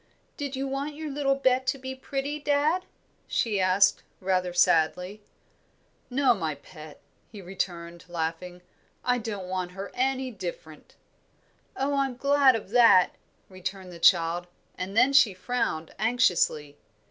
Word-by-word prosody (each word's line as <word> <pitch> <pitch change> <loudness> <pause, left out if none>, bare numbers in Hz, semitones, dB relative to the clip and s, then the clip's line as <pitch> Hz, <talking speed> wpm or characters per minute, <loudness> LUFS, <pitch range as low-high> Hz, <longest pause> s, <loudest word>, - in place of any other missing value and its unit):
"Did 285 -2 -5
you 270 +1 -3
want 280 +2 -4
your 310 -1 -6
little 275 -1 +1
Bet 260 -1 +1
to 265 - +1
be 260 0 -6
pretty, 275 +2 -4
dad?" 295 +5 +1 0.4
she 215 -4 0
asked, 185 +2 +3 0.2
rather 185 -1 0
sadly. 180 +3 +2 0.9
"No, 260 0 +3
my 160 -8 -3
pet," 155 +1 -13 0.3
he 210 - -10
returned, 175 -2 -5
laughing. 175 +1 -4 0.4
"I 245 0 +2
don't 205 -5 -5
want 185 -1 -3
her 195 +1 -7
any 260 0 -1
different." - - -9 0.8
"Oh, 275 +2 0
I 275 -1 +2
am 255 - -8
glad 280 -1 +4
of 210 -3 -6
that," 230 -6 +6 0.4
returned 185 0 -7
the 170 - -11
child; 170 0 +3 0.3
and 190 +3 -5
then 255 +4 +5
she 230 -8 +5
frowned, 185 -7 -2
anxiously. 180 - +1
215 Hz, 140 wpm, -27 LUFS, 180-270 Hz, 0.9 s, that